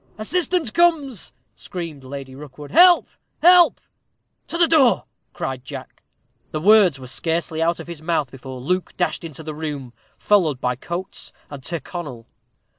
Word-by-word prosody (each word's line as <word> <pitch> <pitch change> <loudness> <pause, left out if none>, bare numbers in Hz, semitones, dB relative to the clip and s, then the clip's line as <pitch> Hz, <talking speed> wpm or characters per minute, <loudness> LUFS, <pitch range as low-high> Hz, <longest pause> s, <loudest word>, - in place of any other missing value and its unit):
"Assistance 345 +4 -1
comes," 305 - +1 0.2
screamed 165 -6 -7
Lady 135 0 -8
Rookwood. 145 +1 -11
"Help! 350 +1 +7 0.4
help!" 355 0 +7 0.7
"To 335 - -4
the 340 -1 +4
door!" 285 -7 +4 0.3
cried 130 -1 -5
Jack. - - -9 0.5
The 155 - -3
words 190 -5 +5
were 130 - -9
scarcely 160 +5 -2
out 170 +1 +1
of - - -7
his 170 -3 -8
mouth 155 -5 -1
before 130 -1 -9
Luke 180 +7 -2
dashed 180 - -1
into 160 -1 -7
the 155 0 -5
room, 145 -5 -6 0.2
followed 170 -10 +2
by 125 0 -1
Coates 175 +8 -5 0.2
and 140 -2 -8
Tyrconnel. 150 -6 -6
165 Hz, 145 wpm, -22 LUFS, 135-215 Hz, 0.7 s, Help